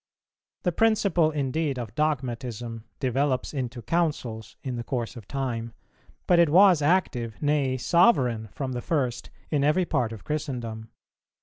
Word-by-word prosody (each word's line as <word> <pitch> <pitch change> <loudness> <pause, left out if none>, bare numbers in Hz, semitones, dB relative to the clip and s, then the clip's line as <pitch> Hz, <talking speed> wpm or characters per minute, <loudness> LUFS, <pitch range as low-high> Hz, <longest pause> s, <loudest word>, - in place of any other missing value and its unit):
The 180 - +2
principle 200 -5 +3
indeed 145 -1 -1
of 115 -4 -5
Dogmatism 120 -6 -2
developes 130 +1 0
into 125 -4 -4
Councils 130 -7 -2
in 130 -2 -3
the 120 - -4
course 120 -2 -3
of 110 -5 -11
time; 120 -4 -3 0.5
but 175 - +4
it 170 -3 +5
was 180 0 +6
active, 135 - +1
nay 145 -3 +1
sovereign 125 - +3
from 130 +5 -4
the 125 -1 -3
first, 130 -6 -1 0.2
in 145 -3 +2
every 155 +5 +3
part 120 -8 0
of 110 -3 -9
Christendom. 120 -7 -4
130 Hz, 140 wpm, -26 LUFS, 120-155 Hz, 0.5 s, was